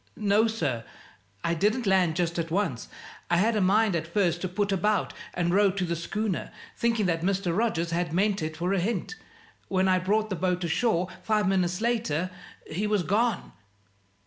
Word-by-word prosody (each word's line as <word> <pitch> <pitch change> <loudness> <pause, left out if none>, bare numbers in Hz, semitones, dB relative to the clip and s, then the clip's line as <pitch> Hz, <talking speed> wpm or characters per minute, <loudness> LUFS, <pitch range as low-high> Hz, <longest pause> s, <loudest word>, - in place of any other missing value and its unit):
"No, 210 +2 +3
sir; 145 - -2 0.6
I 170 - +1
didn't 215 +8 +1
land 185 -4 +3
just 170 -1 -1
at 165 0 -2
once. 165 - -1 0.4
I 175 - +3
had 220 +5 +2
a 210 - +2
mind 200 +1 +3
at 165 -1 -2
first 175 -1 +1
to 185 - -1
put 200 +2 -1
about 205 +3 +1 0.2
and 175 0 0
row 200 +1 +5
to 190 -1 -2
the 170 0 -1
schooner, 210 +4 -3 0.2
thinking 230 -3 +1
that 165 -2 0
Mr. 185 -1 0
Rogers 180 -6 0
had 170 -1 -1
meant 200 +3 +1
it 155 0 -4
for 175 +3 0
a 195 - +2
hint. 205 - -2 0.5
When 190 0 +1
I 185 -1 +3
brought 215 +3 0
the - - 0
boat 180 +1 -1
ashore, 175 +1 +1
five 210 -2 +1
minutes 180 0 +1
later, 215 -8 0 0.3
he 195 +7 -2
was 210 -3 +1
gone." 220 +3 0
190 Hz, 185 wpm, -27 LUFS, 170-210 Hz, 0.6 s, row